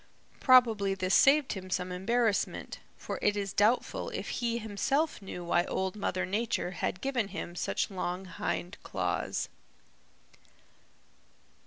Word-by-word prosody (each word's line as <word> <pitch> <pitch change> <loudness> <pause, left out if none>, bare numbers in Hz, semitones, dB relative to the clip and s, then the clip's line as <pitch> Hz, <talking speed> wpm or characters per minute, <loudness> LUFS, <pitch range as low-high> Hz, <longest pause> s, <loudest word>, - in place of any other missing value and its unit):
Probably 225 -7 +5
this 185 0 -1
saved 280 0 +5
him 185 -2 -7
some 180 0 -1
embarrassment, 215 +3 0 0.2
for - - -5
it 210 0 +2
is 200 -2 -2
doubtful 215 +5 +2
if - - -5
he 235 -1 -1
himself 235 +7 0
knew 185 -2 -7
why 175 0 +3
Old 190 0 -2
Mother 185 -3 -1
Nature 205 -1 -1
had 180 0 -3
given 255 -6 0
him 175 -3 -6
such 180 - -1
long 180 0 -3
hind 180 0 -3
claws. - - -2
200 Hz, 130 wpm, -30 LUFS, 185-235 Hz, 0.2 s, Probably